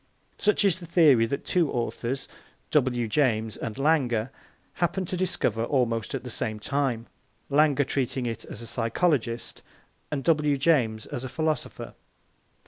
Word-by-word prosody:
Such 210 0 +3
is 185 -2 +2
the 170 - -10
theory 145 -9 +5
that 140 - -4
two 170 -5 +2
authors 120 +2 -2 0.4
W. 125 -5 +2
James 110 -3 +1
and 110 -2 -5
Lange 135 -6 +2 0.4
happened 180 +1 -1
to - - -1
discover 165 - 0
almost 120 -5 0
at - - -4
the 125 - -6
same 110 -1 -3
time, 125 -1 -1 0.5
Lange 145 -1 +4
treating 130 -1 -1
it 115 -2 -3
as - - -9
a - - -7
physiologist 120 0 -1 0.5
and 140 -2 -3
W. 150 -2 +3
James 125 -8 +2
as 125 - -5
a 130 - -5
philosopher. 155 +3 -3
130 Hz, 145 wpm, -26 LUFS, 115-155 Hz, 0.5 s, theory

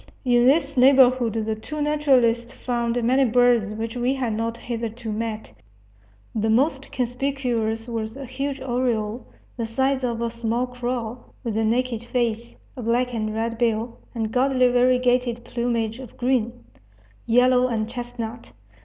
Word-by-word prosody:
In 245 -1 +4
this 280 0 +2
neighborhood 255 -2 +5
the 220 -1 -1
two 260 +8 -7
naturalists 260 -5 +2
found 240 -2 -1
many 260 +4 +4
birds 240 -3 +3
which 225 +1 -4
we 250 +2 0
had 250 -4 -1
not 230 +1 -2
hitherto 230 -1 -5
met. 220 - -4 0.8
The 220 0 0
most 270 +4 +1
conspicuous 245 -3 -1
was 225 -1 -4
a 275 0 -7
huge 275 +2 -4
oriole, 240 -3 -1 0.3
the 230 -2 -2
size 265 +3 0
of 235 -2 -1
a 230 - -1
small 235 +1 -1
crow, 245 -1 -4 0.2
with 230 -4 -3
a 225 - +1
naked 235 +1 0
face, 235 -1 -2 0.2
a 255 - -6
black 245 +2 0
and 215 -2 -2
red 230 +1 -2
bill, 230 0 0 0.2
and 220 -2 -2
gaudily 255 0 +3
variegated 245 -1 +2
plumage 235 -1 -2
of 255 -4 -11
green, 245 -1 0 0.6
yellow, 250 +2 +4
and 220 -3 -1
chestnut. 240 -1 -6
240 Hz, 145 wpm, -23 LUFS, 225-255 Hz, 0.8 s, neighborhood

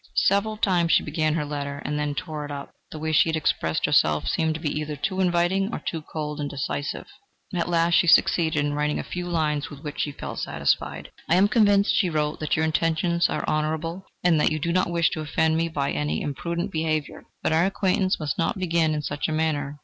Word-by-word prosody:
Several 205 +2 +2
times 180 -6 +2
she - - +4
began 155 0 0
her 150 -3 -1
letter, 140 -1 -4
and 150 +1 -2
then 145 -1 -2
tore 155 -2 -4
it 145 - -7
up: 140 -1 -6 0.2
the - - -8
way 160 +1 -2
she 155 - +4
had 160 - 0
expressed 80 - 0
herself 75 -1 +3
seemed 160 -1 +1
to - - -4
her - - -9
either 150 0 -2
too 190 +6 -2
inviting 185 +3 +1
or - - -3
too 165 - -4
cold 150 -1 -5
and 145 -1 -2
decisive. 140 +1 -3 0.5
At 175 -1 -1
last 170 0 +2
she 175 - +4
succeeded 160 -3 +4
in 145 - -1
writing 150 0 0
a - - -3
few 180 0 -5
lines 155 -4 -1
with 145 0 -11
which 150 -1 -6
she 145 - 0
felt - - -6
satisfied. - - -1 0.2
"I 165 - +5
am 190 +3 +5
convinced," 205 -2 +4
she 185 - +2
wrote, 150 -2 -1
"that 155 - 0
your 160 - +1
intentions 165 +2 +1
are - - -3
honourable, 160 +4 -1 0.2
and 165 -3 +4
that - - +3
you 155 - 0
do 170 +3 -1
not 185 -1 +2
wish 170 -1 +2
to 160 - -3
offend 160 +1 +1
me 165 +1 0
by 140 -3 -1
any 75 +1 -1
imprudent 170 +6 -3
behaviour, 155 -2 -2 0.2
but - - +1
our 165 +4 +3
acquaintance 190 -1 +1
must 150 -3 -3
not 170 +6 0
begin 165 -4 +1
in 150 - -3
such 145 0 -2
a - - -3
manner. 150 -2 -1
160 Hz, 225 wpm, -25 LUFS, 150-175 Hz, 0.5 s, I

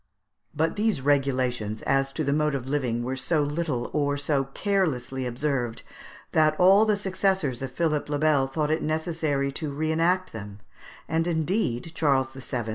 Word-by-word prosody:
] - - -38
But 165 +5 +1
these 215 -5 +1
regulations 130 -6 0
as 135 0 +1
to 155 - -2
the 140 -1 +1
mode 150 -1 +1
of 130 -2 -4
living 125 -4 -1
were 130 +2 -2
so 145 +4 +1
little 145 -4 -2
or 145 -1 +1
so 140 -1 0
carelessly 135 -6 -1
observed, 125 -2 -2 0.5
that 155 -1 +3
all 195 +4 +6
the 210 -2 +2
successors 190 - 0
of 135 -1 -4
Philippe 150 0 -1
le 145 - +1
Bel 145 -3 +3
thought 150 +3 -1
it 160 - +1
necessary 155 -3 -1
to 150 +1 -4
re 155 +3 -1
enact 180 +3 +1
them, 105 -2 -8 0.5
and, 165 +1 0
indeed, 165 - -1
Charles 135 -4 +1
VII. 130 -2 -4
145 Hz, 170 wpm, -26 LUFS, 130-160 Hz, 0.5 s, all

